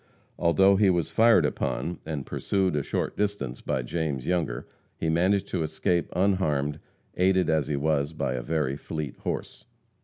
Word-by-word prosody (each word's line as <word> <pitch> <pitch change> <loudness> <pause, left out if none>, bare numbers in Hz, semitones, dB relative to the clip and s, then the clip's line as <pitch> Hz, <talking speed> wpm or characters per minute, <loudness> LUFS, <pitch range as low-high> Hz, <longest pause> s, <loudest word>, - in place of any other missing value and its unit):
Although 95 +4 +4
he 100 -1 +4
was 85 -3 +1
fired 115 -7 +5
upon 85 +3 -2
and 75 -4 -3
pursued 95 -4 0
a 75 - +1
short - - -2
distance 100 -12 -2
by - - -1
James 75 -6 -2
Younger, 85 -9 -1 0.3
he 80 - -1
managed 95 +4 +2
to 90 - -1
escape 85 +2 0
unharmed, 75 -7 +1 0.4
aided 95 -1 +3
as 80 -4 +1
he 75 - -1
was 70 0 0
by 70 -5 -2
a 65 - -2
very 75 0 -1
fleet 75 0 -5
horse. - - -5
80 Hz, 160 wpm, -27 LUFS, 75-95 Hz, 0.4 s, fired